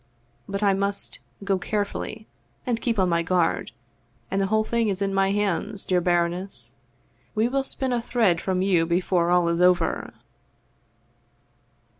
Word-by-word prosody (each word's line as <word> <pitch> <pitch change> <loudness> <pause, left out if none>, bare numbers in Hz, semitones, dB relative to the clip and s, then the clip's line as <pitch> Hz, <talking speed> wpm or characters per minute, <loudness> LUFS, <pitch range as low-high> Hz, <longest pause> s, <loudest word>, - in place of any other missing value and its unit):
But 200 +1 -2
I 200 -1 +4
must 200 +1 -3 0.2
go 195 -1 +1
carefully 215 +2 -3 0.4
and 235 -2 -1
keep 230 -3 0
on 190 -2 +3
my 170 -1 +2
guard, 175 0 +1 0.6
and 195 +1 +1
the 195 - +1
whole 220 +2 +2
thing 230 0 0
is 195 -2 -1
in 195 -1 -1
my 195 0 +2
hands, 205 0 -1
dear 180 -1 +2
baroness! 175 +2 -1 0.6
We 220 +2 +2
will 270 +2 0
spin 265 -1 -3
a 240 - 0
thread 220 -8 +2
from 185 -1 0
you 175 -4 +2
before 175 0 +1
all 175 -1 +3
is 170 +1 +1
over.' 180 -2 +2
195 Hz, 155 wpm, -25 LUFS, 180-215 Hz, 0.6 s, I